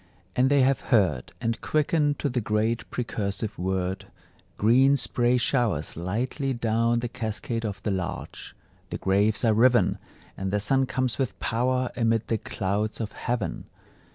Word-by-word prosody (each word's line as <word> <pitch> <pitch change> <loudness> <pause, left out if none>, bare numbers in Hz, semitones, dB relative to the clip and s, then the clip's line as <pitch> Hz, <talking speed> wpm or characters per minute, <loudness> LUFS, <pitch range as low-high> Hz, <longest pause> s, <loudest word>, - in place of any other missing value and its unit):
And 130 +1 +3
they 140 -1 +4
have 135 +1 +3
heard, 95 - +2
And 115 -1 -2
quicken 150 -1 +1
to 145 - -2
the 125 -2 -1
great 110 +2 -1
precursive 110 -3 -3
word; 95 +1 -2 0.5
Green 130 +6 +5
spray 120 +1 +1
showers 120 - 0
lightly 120 - -2
down 115 0 +1
the 120 - -2
cascade 115 -1 -4
of 100 -2 -5
the 105 - 0
larch; 95 -2 -5 0.3
The - - -4
graves 100 +4 +2
are 110 - +4
riven, 120 -3 +4 0.4
And 95 0 -3
the 105 +2 0
Sun 130 +6 +2
comes 130 -4 -1
with 130 -3 -2
power 125 +2 0
amid 115 -2 +1
the 115 - +1
clouds 105 +3 -2
of 110 -2 -3
heaven! 120 +1 -3
115 Hz, 155 wpm, -26 LUFS, 105-125 Hz, 0.5 s, Green